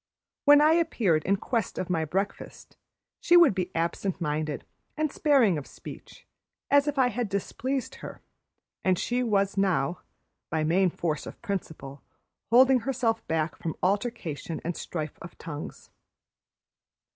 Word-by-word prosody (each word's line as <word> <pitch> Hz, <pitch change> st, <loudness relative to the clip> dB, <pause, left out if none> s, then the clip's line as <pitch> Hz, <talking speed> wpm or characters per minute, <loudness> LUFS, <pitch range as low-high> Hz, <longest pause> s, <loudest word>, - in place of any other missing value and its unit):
When 290 Hz, 0 st, +8 dB
I 305 Hz, +1 st, +6 dB
appeared 235 Hz, -, +2 dB
in 195 Hz, -, +3 dB
quest 225 Hz, +1 st, -2 dB
of 185 Hz, -, -2 dB
my 165 Hz, -3 st, 0 dB
breakfast, 195 Hz, +5 st, -4 dB, 0.4 s
she 350 Hz, -, +5 dB
would 340 Hz, -9 st, +7 dB
be 185 Hz, -1 st, -2 dB
absent 170 Hz, +3 st, -1 dB
minded 150 Hz, -2 st, -2 dB, 0.3 s
and 310 Hz, -1 st, 0 dB
sparing 250 Hz, -, +3 dB
of 140 Hz, -, -10 dB
speech, -, -, -12 dB, 0.5 s
as 285 Hz, +1 st, +5 dB
if 295 Hz, -1 st, -1 dB
I 255 Hz, -2 st, +4 dB
had 245 Hz, -3 st, -3 dB
displeased 255 Hz, +7 st, -3 dB
her, -, -, -8 dB, 0.6 s
and 185 Hz, -1 st, +2 dB
she 245 Hz, +6 st, -1 dB
was 200 Hz, -4 st, +1 dB
now, 180 Hz, -4 st, +1 dB, 0.5 s
by 160 Hz, -1 st, 0 dB
main 180 Hz, +4 st, +3 dB
force 160 Hz, -2 st, -3 dB
of -, -, -9 dB
principle, 160 Hz, -9 st, -5 dB, 0.5 s
holding 255 Hz, +2 st, +6 dB
herself 240 Hz, -3 st, -1 dB
back 160 Hz, -1 st, -1 dB
from 160 Hz, -, -4 dB
altercation 185 Hz, -, -2 dB
and 175 Hz, 0 st, -2 dB
strife 155 Hz, -4 st, -5 dB
of 170 Hz, -, -10 dB
tongues. 150 Hz, -3 st, -8 dB
195 Hz, 145 wpm, -27 LUFS, 165-250 Hz, 0.6 s, When